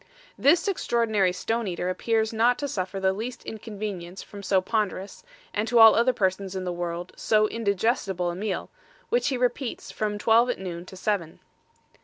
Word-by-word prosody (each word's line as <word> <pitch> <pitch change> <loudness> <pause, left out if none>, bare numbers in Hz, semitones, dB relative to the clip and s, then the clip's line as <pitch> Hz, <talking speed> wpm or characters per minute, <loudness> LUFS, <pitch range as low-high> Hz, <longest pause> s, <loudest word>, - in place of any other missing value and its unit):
This 335 +7 +4
Extraordinary 230 - +1
Stone 225 +5 -2
eater 180 -1 -3
appears 220 +4 0
not 235 +3 +3
to 285 - -3
suffer 195 -5 -3
the 190 0 +2
least 230 +5 -6
Inconvenience 200 -5 -6
from 205 - -10
so 195 -1 +2
ponderous, 200 - -2 0.3
and 210 +2 -1
to 240 +1 +2
all 225 -1 +10
other 235 +3 +4
persons 190 -3 -1
in 190 - -3
the 180 -1 -2
World, 175 0 -4
so 215 -1 +2
indigestible 200 -4 0
a - - -6
Meal, 195 0 -3 0.4
which 485 - +2
he 270 -3 0
repeats 245 +1 -2
from 210 -1 -2
twelve 230 +3 +4
at 245 - -1
noon 175 -2 -6
to 190 - -10
seven. 185 -4 -2
210 Hz, 175 wpm, -26 LUFS, 185-230 Hz, 0.4 s, all